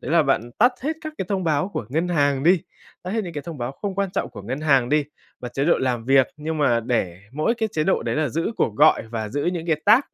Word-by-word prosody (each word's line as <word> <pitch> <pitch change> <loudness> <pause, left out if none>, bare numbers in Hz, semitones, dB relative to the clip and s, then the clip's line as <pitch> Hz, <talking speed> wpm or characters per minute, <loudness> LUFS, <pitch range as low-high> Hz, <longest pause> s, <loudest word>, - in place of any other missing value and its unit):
đấy 130 - -6
là 165 -2 +5
bạn 130 -4 0
tắt 245 +3 +5
hết 305 +3 0
các 310 -1 -5
cái 190 - -1
thông 195 -3 -1
báo 155 +3 +1
của 115 - -5
ngân 160 +7 -1
hàng 145 -5 +1
đi, 175 +1 +4 0.4
tắt 185 - -5
hết 220 -1 -1
những 175 - -6
cái 145 -2 -5
thông 165 -5 -8
báo 120 +2 -3
không 195 +6 -5
quan 195 -1 -1
trọng - - -2
của 100 - -10
ngân 130 +8 -4
hàng 135 -5 +3
đi 150 +1 +2 0.4
và 125 - -5
chế 135 +3 -2
độ 170 - +3
làm 125 -3 -1
việc, 135 0 +4
nhưng 155 +1 -4
mà 120 -5 +3
để 95 -7 -1
mỗi 155 - +1
cái 220 -2 -1
chế 155 -1 0
độ 190 - +1
đấy - - -2
là 155 -2 +1
giữ 165 - -2
cuộc 105 - 0
gọi - - +5
và 110 -2 -4
giữ 145 +5 -2
những 175 -1 -2
cái 155 -2 0
tag 215 +5 +7
150 Hz, 285 wpm, -23 LUFS, 130-180 Hz, 0.4 s, tag